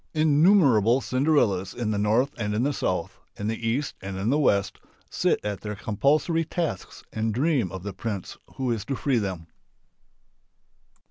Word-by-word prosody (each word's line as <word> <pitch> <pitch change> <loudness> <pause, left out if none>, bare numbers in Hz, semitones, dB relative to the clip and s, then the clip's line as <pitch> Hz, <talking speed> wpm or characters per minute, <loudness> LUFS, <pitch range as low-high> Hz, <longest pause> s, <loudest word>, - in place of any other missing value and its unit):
Innumerable 145 - +4
Cinderellas 130 -10 +1
in 115 -3 -2
the 105 - -1
north 115 +7 +2
and 105 -2 -2
in 115 - +1
the 145 +2 +1
south, 90 -9 -2 0.2
in 105 - -5
the 115 +1 -2
east 135 +5 -1
and 95 0 -5
in 100 +5 0
the 145 - +2
west, 100 -9 +1 0.3
sit - - +1
at 105 -2 -3
their 105 -1 -5
compulsory 145 - +1
tasks 165 - -4
and 110 0 -1
dream 130 - +1
of 95 -2 -7
the 100 -1 -5
prince 100 0 -5 0.2
who 130 -2 -1
is 110 -3 -2
to 135 - -2
free 130 -2 +1
them. 95 -5 -4
115 Hz, 170 wpm, -25 LUFS, 100-140 Hz, 0.3 s, Innumerable